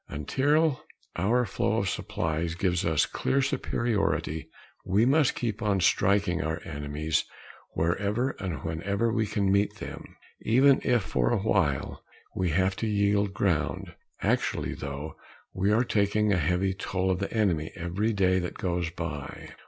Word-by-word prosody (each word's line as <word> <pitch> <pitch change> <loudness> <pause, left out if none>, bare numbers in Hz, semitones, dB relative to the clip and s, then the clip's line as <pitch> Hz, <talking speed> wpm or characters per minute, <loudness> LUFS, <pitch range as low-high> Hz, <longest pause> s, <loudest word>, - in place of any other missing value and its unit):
Until 145 - +1 0.3
our 115 +8 +2
flow 100 - 0
of - - 0
supplies 80 +1 -2
gives 90 0 0
us 80 -3 +3
clear 135 - 0
superiority 110 - -1 0.3
we 100 +5 +2
must 140 +1 +3
keep 115 -2 -3
on 100 -3 +1
striking 95 -1 +2
our 80 +1 -2
enemies 75 +1 -2 0.5
wherever 100 +10 0
and 85 -9 -4
whenever 100 +8 -1
we 110 -2 +1
can 100 -2 0
meet 100 +1 +2
them, - - -9 0.3
even 130 +5 +4
if, 120 -4 +2
for - - 0
a 120 - +2
while, 80 -10 0 0.3
we 90 -1 0
have 95 +4 +1
to 115 - -2
yield 100 -1 +1
ground. 90 -7 -1 0.3
Actually, - - 0
though, 70 +2 -6 0.4
we 95 +2 +1
are 110 +3 +4
taking 105 -2 +1
a - - +2
heavy 90 +5 +1
toll 95 0 -1
of 90 - -1
the 100 - -3
enemy 90 -8 0
every 95 +5 -1
day 95 -3 +2
that 90 -1 -4
goes 90 -2 -1
by. 80 -4 -6
95 Hz, 150 wpm, -27 LUFS, 85-110 Hz, 0.5 s, even